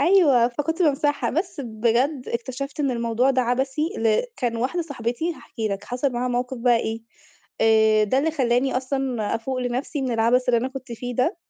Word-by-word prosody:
أيوه، 285 -8 +5
فكنت 295 +8 -2
بامسحها. 290 -1 +1
بس 330 -2 -2
بجد 240 +4 0
اكتشفت 260 +5 -4
إن 280 -2 +1
الموضوع 235 +1 +1
ده 260 -1 +2
عبثي 265 +4 0 0.2
ل 225 -1 +2
كان 240 - -1
واحدة 265 +10 -1
صاحبتي 285 +2 -3
هاحكي 225 -7 -5
لك، 195 -1 -4
حصل 250 +2 -1
معاها 245 +1 -1
موقف 250 +1 -2
بقى 240 0 +4
إيه، 225 0 -2 0.6
آآ، 220 -1 +5
ده 235 +6 +1
اللي 310 +4 +1
خلاني 260 -3 +1
أصلًا 255 -4 -1
أفوق 255 +3 -3
لنفسي 255 +4 -2
من 255 -2 -1
العبث 235 +3 +2
اللي 240 -1 +4
أنا 255 - -1
كنت 265 -2 -8
فيه 245 +2 -5
ده. 255 +6 +1
250 Hz, 185 wpm, -23 LUFS, 235-275 Hz, 0.6 s, أيوه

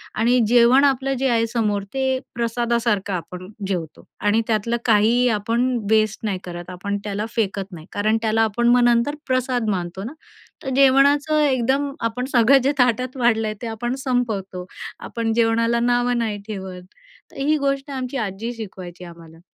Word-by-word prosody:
आणि 240 +3 +3
जेवण 245 +3 +5
आपलं 270 0 +1
जे 270 - +1
आहे 230 -1 +2
समोर 210 -4 -1
ते 265 -1 0 0.2
प्रसादासारखं 235 -4 0
आपण 180 +1 -6 0.2
जेवतो 170 -5 -4 0.2
आणि 210 +2 +2
त्यातलं 230 +2 0
काहीही 230 +3 +4
आपण 230 +4 0 0.3
वेस्ट 215 -1 +2
नाही 195 -3 -2
करत 175 0 -7
आपण 200 +3 -3
त्याला 205 +1 -3
फेकत 195 -3 -2
नाही. 160 -2 -10
कारण 215 +2 +1
त्याला 220 0 +2
आपण 235 +2 0
मग 245 0 +5
नंतर 240 +5 +2
प्रसाद 255 -3 0
मानतो 180 0 -3
ना, 250 +7 -6 0.5
तर 265 - -3
जेवणाचं 280 +3 +4
एकदम 275 +1 +1
आपण 230 +2 -2
सगळं 245 +3 +6
जे 275 - +3
ताटात 250 +2 +1
वाढलं 225 -3 +2
आहे 215 - -3
ते 235 - -4
आपण 240 +3 -3
संपवतो. 205 -8 -2 0.3
आपण 225 -1 -3
जेवणाला 230 0 +2
नावं 245 0 +1
नाही 215 -3 -2
ठेवत. 190 -3 -6 0.5
तर - - -15
ही 300 +3 +1
गोष्ट 275 0 -2
आमची 260 0 -4
आजी 220 +5 -5
शिकवायची 185 -4 -9
आम्हाला. 165 -1 -14
230 Hz, 165 wpm, -21 LUFS, 205-250 Hz, 0.5 s, सगळं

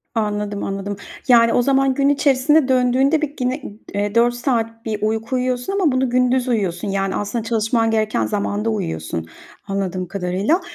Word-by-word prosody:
Anladım, 210 -2 -2
anladım. 195 +1 -3 0.3
Yani, 230 -2 +5
o 245 - +3
zaman 270 0 +2
gün 275 +1 +2
içerisinde 285 +1 +3
döndüğünde, 260 +4 +3
bir, 295 -2 -2
yine 255 +3 -1 0.5
4 240 +1 +4
saat 230 -2 -2
bir 215 -2 -3
uyku 220 +3 -1
uyuyorsun 250 +6 -1
ama 315 - +3
bunu 255 0 +1
gündüz 250 +1 +2
uyuyorsun, 200 -6 -1
yani, 195 0 -1
aslında 215 +2 -2
çalışman 225 0 +1
gereken 215 -1 +1
zamanda 205 +1 -1
uyuyorsun, 80 - -3 0.4
anladığım 185 -2 -2
kadarıyla. 195 - 0
230 Hz, 150 wpm, -20 LUFS, 205-255 Hz, 0.5 s, Yani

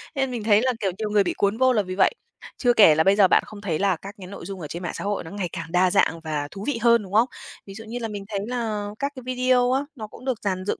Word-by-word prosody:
nên 270 -1 0
mình 235 -4 -4
thấy 210 -1 +4
là, 255 +1 +2
kiểu, 195 -4 0
nhiều 215 -1 -3
người 210 -1 +3
bị - - -1
cuốn 200 +2 +1
vô 260 +1 +4
là 215 - +2
vì 185 -1 -6
vậy. 190 - +4 0.5
Chưa 245 -2 +3
kể 205 -9 +7
là 160 - +3
bây 195 +1 +4
giờ 200 -3 +6
bạn - - +4
không 210 -1 -11
thấy 170 -6 -2
là 195 -2 +2
các 200 +5 -10
cái 185 -2 -10
nội 200 -2 -9
dung 195 0 -7
ở 155 - -5
trên 170 +5 -7
mạng 175 - -3
xã - - -5
hội 205 0 -2
nó 160 - -10
ngày 195 -4 -3
càng 165 0 -7
đa 180 0 +3
dạng 165 - +2
và 150 -2 -3
thú 195 - -8
vị 290 -5 0
hơn, 235 -2 +4
đúng 190 - -11
không? 225 +4 +4 0.4
Ví 195 - -10
dụ 220 +3 -9
như 235 +2 -5
là 230 - -3
mình 205 -2 -7
thấy 205 -2 -2
là 220 -4 -2
các 280 0 -1
cái 255 - -9
video 255 0 +2
á, 265 +2 +2
nó 220 -5 -7
cũng 235 +4 -14
được 255 -4 -1
dàn 185 -1 -2
dựng - - -2
205 Hz, 325 wpm, -24 LUFS, 185-235 Hz, 0.5 s, kể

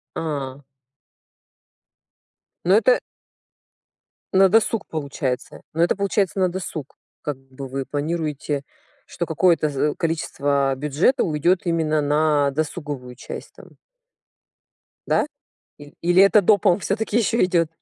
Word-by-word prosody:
А. 140 -3 -4 2.0
Но 180 - +4
это 230 +3 +4 1.4
На 190 0 +6
досуг 225 +1 +2
получается. 140 -4 -4
Ну, 165 +2 +2
это 175 - +2
получается 195 -2 0
на 185 -1 +3
досуг. 175 -6 -6 0.3
Как 150 -3 -4
бы, 135 0 -10
вы 135 +1 -4
планируете, 150 0 -2 0.4
что 170 - -4
какое-то 165 -1 +2
за 145 +1 0
количество 140 -4 0
бюджета 150 - +1
уйдёт 170 +3 +2
именно 160 -3 +1
на 150 0 +2
досуговую 145 -3 -4
часть, - - -9
там. - - -16 1.3
Да? - - +2 0.5
Или 145 0 -13
или 175 +2 +5
это 200 +2 +6
допом 200 -2 +4
всё-таки 210 +2 -2
ещё 230 +1 +2
идёт? 175 -3 +2
155 Hz, 115 wpm, -22 LUFS, 145-185 Hz, 2.0 s, На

